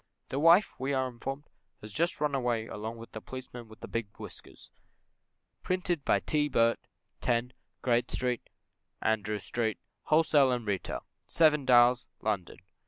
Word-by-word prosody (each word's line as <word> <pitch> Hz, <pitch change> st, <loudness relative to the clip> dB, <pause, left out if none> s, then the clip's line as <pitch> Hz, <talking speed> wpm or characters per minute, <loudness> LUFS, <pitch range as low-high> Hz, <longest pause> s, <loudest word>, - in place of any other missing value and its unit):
The 135 Hz, -, -2 dB
wife, 170 Hz, +6 st, +6 dB
we 135 Hz, +2 st, -1 dB
are 130 Hz, -1 st, +1 dB
informed, 135 Hz, +3 st, -6 dB, 0.4 s
has 105 Hz, -1 st, -10 dB
just 170 Hz, +3 st, 0 dB
ran 150 Hz, -1 st, 0 dB
away 120 Hz, -4 st, 0 dB
along 110 Hz, +1 st, -6 dB
with 115 Hz, 0 st, -11 dB
the 110 Hz, -, -7 dB
Policeman 125 Hz, -2 st, -9 dB
with 110 Hz, 0 st, -15 dB
the -, -, -7 dB
big 115 Hz, -2 st, -3 dB
whiskers. -, -, -12 dB, 0.9 s
Printed 180 Hz, -4 st, -1 dB
by -, -, +3 dB
T. 150 Hz, -1 st, +1 dB
Birt, 115 Hz, -3 st, +3 dB, 0.4 s
10, 120 Hz, +1 st, 0 dB, 0.3 s
Great 120 Hz, -1 st, +2 dB
St. 125 Hz, -2 st, -1 dB, 0.6 s
Andrew 105 Hz, -1 st, 0 dB
Street, 110 Hz, +2 st, -2 dB, 0.3 s
Wholesale 150 Hz, -4 st, +4 dB
and 120 Hz, -2 st, -3 dB
Retail, 100 Hz, -3 st, -3 dB, 0.2 s
Seven 150 Hz, -4 st, +3 dB
Dials, 125 Hz, 0 st, +5 dB
London. 100 Hz, -5 st, -2 dB
125 Hz, 150 wpm, -30 LUFS, 115-140 Hz, 0.9 s, wife